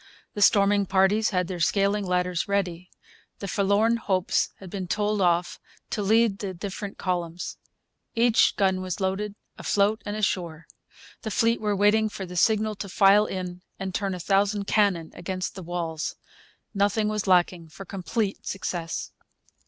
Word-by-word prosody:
The 205 - -4
storming 200 0 +4
parties 195 +4 +3
had 180 -3 0
their 180 -2 -5
scaling 200 +3 +1
ladders 180 -1 0
ready. 180 -3 -2 0.5
The 200 - -6
Forlorn 200 +5 +2
Hopes 190 -5 0
had 190 -3 -11
been 190 -3 -4
told 210 +2 0
off 175 -1 +1 0.3
to 215 - -1
lead 215 0 +3
the 190 -3 -4
different 200 +2 -6
columns. 175 -2 -3 0.6
Every 235 0 +4 0.2
gun 190 -2 +1
was 185 0 -4
loaded, 200 +2 -2 0.2
afloat 210 +2 +1
and 205 - -4
ashore. 170 -6 -2 0.6
The 220 - -4
fleet 230 +1 +1
were 210 -1 0
waiting 210 +2 +3
for 195 -2 -6
the 180 0 -9
signal 215 +3 +2
to 200 - -6
file 200 +2 +5
in 180 -1 -5 0.2
and 190 -1 -4
turn 195 -1 -1
a - - -7
thousand 200 +2 +1
cannon 195 -7 +1
against 185 +1 -4
the 190 - -8
walls. 170 -2 -3 0.6
Nothing 205 +1 +1
was 210 -1 -2
lacking 175 -2 +2
for 175 +5 -10
complete 195 +3 -3
success. 175 -3 -4
195 Hz, 155 wpm, -26 LUFS, 180-210 Hz, 0.6 s, file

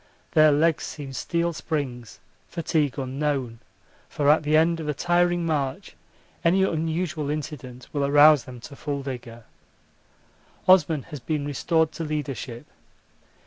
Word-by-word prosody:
Their 155 -1 +6
legs 155 +2 +2
seem 140 -3 -7
steel 170 +5 -1
springs, 135 -8 -4 0.3
fatigue 155 -4 -1
unknown 135 -3 -2 0.5
for 145 0 +3
at 155 - +4
the 155 0 +2
end 165 +1 +3
of 155 -2 -4
a 150 - -1
tiring 175 +1 +1
march 140 -5 -2 0.5
any 185 +3 +4
unusual 160 -3 -1
incident 145 -5 -6
will 145 -2 0
arouse 145 0 +6
them 125 -1 -10
to 140 - -10
full 140 -1 -4
vigour. 120 -3 -7 1.2
Osman 170 -6 +5
has 145 - -5
been 145 +3 -2
restored 160 +3 +1
to 165 - -6
leadership. 135 -6 -4
150 Hz, 135 wpm, -25 LUFS, 135-160 Hz, 1.2 s, Their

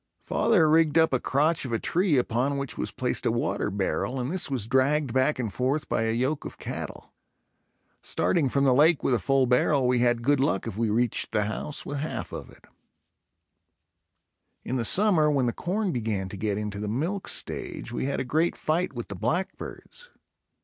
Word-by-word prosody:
Father 180 -9 +3
rigged 160 0 +4
up 160 -3 +4
a 130 - +2
crotch 155 +7 +2
of 130 - -4
a 115 - +1
tree 175 - +1
upon 125 +3 0
which 140 -2 -3
was - - -2
placed - - -2
a - - +1
water - - -1
barrel 100 +6 -2
and 125 +3 -2
this 180 -4 +1
was 130 -7 -2
dragged 130 +2 +1
back 130 +3 +2
and 115 -6 -3
forth 135 +4 -1
by 115 - 0
a 110 - +1
yoke 130 +6 -1
of - - -8
cattle. - - -7 0.9
Starting 155 -7 0
from 140 +2 +1
the 135 -2 +4
lake 150 +4 +4
with 130 - +2
a 120 - +2
full 135 +7 +2
barrel 125 +2 +2
we 125 -1 +2
had 120 -1 +2
good 145 +2 +3
luck 130 -8 0
if 115 -4 -5
we 115 0 0
reached 115 +2 0
the 105 -1 +1
house 110 +8 -3
with 145 0 -4
half 155 - -4
of - - -7
it. - - -18 2.0
In 130 - -2
the 120 - -1
summer 180 - +4
when 140 -4 +2
the 120 - 0
corn 195 +2 -2
began 105 - -2
to 100 - -7
get 100 0 -2
into 105 -1 -4
the 105 - -4
milk 165 - -2
stage, - - -4
we 120 - -2
had 140 - -1
a - - -1
great 160 +6 +1
fight 165 +1 -1
with 120 -2 -6
the 100 - -7
blackbirds. 180 - -4
130 Hz, 200 wpm, -26 LUFS, 115-155 Hz, 2.0 s, rigged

